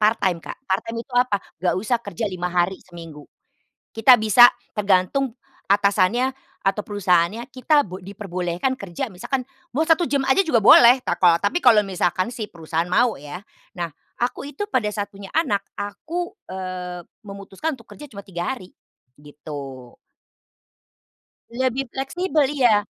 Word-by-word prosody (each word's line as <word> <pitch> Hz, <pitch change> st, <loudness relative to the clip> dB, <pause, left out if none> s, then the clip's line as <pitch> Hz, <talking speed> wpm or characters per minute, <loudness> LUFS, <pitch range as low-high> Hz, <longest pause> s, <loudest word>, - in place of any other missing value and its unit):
part 215 Hz, +2 st, +4 dB
time, 175 Hz, -3 st, +1 dB
Kak. -, -, -8 dB
Part 190 Hz, -3 st, 0 dB
time 230 Hz, -, -4 dB
itu 270 Hz, -, -25 dB
apa? 245 Hz, -3 st, +2 dB, 0.2 s
Enggak 180 Hz, -, +1 dB
usah 220 Hz, +6 st, 0 dB
kerja 205 Hz, -1 st, -5 dB
5 180 Hz, 0 st, -3 dB
hari 180 Hz, +1 st, 0 dB
seminggu. 165 Hz, -4 st, -11 dB, 0.7 s
Kita 240 Hz, +3 st, +6 dB
bisa 220 Hz, +3 st, +7 dB, 0.2 s
tergantung 210 Hz, +6 st, +1 dB, 0.3 s
atasannya 205 Hz, +5 st, +2 dB, 0.3 s
atau 195 Hz, +2 st, +1 dB
perusahaannya, 200 Hz, +2 st, +1 dB
kita 290 Hz, +2 st, +2 dB
bo 185 Hz, +2 st, -8 dB
diperbolehkan 185 Hz, +3 st, -3 dB
kerja 200 Hz, +2 st, -5 dB
misalkan 255 Hz, +7 st, -3 dB, 0.3 s
mau 310 Hz, +6 st, 0 dB
1 330 Hz, +1 st, +4 dB
jam 275 Hz, -1 st, 0 dB
saja 330 Hz, +9 st, +4 dB
juga 305 Hz, -10 st, +2 dB
boleh, 240 Hz, +4 st, +8 dB
tako 170 Hz, -2 st, +4 dB
tapi 205 Hz, -, -1 dB
kalau 230 Hz, -4 st, +7 dB
misalkan 185 Hz, 0 st, 0 dB
si 215 Hz, -4 st, -5 dB
perusahaan 165 Hz, 0 st, -3 dB
mau 240 Hz, +3 st, +3 dB
ya. 145 Hz, +5 st, -8 dB, 0.4 s
Nah, 170 Hz, -, -1 dB, 0.3 s
aku 245 Hz, +1 st, -2 dB
itu 410 Hz, +6 st, -5 dB
pada 215 Hz, -, 0 dB
saat 205 Hz, -1 st, -3 dB
punya 200 Hz, -1 st, -12 dB
anak 210 Hz, -12 st, 0 dB, 0.2 s
aku, 330 Hz, -, -5 dB, 0.2 s
eee, 185 Hz, -1 st, -5 dB, 0.2 s
memutuskan 200 Hz, +8 st, -5 dB
untuk 230 Hz, -, -18 dB
kerja 295 Hz, -2 st, -12 dB
cuma 200 Hz, -2 st, -10 dB
3 175 Hz, +2 st, -3 dB
hari, 215 Hz, -9 st, -9 dB, 0.4 s
gitu. 145 Hz, -3 st, -10 dB, 1.6 s
Lebih 260 Hz, +2 st, -1 dB
fleksibel 300 Hz, +5 st, -1 dB
iya. 230 Hz, -7 st, +3 dB
205 Hz, 150 wpm, -22 LUFS, 180-255 Hz, 1.6 s, boleh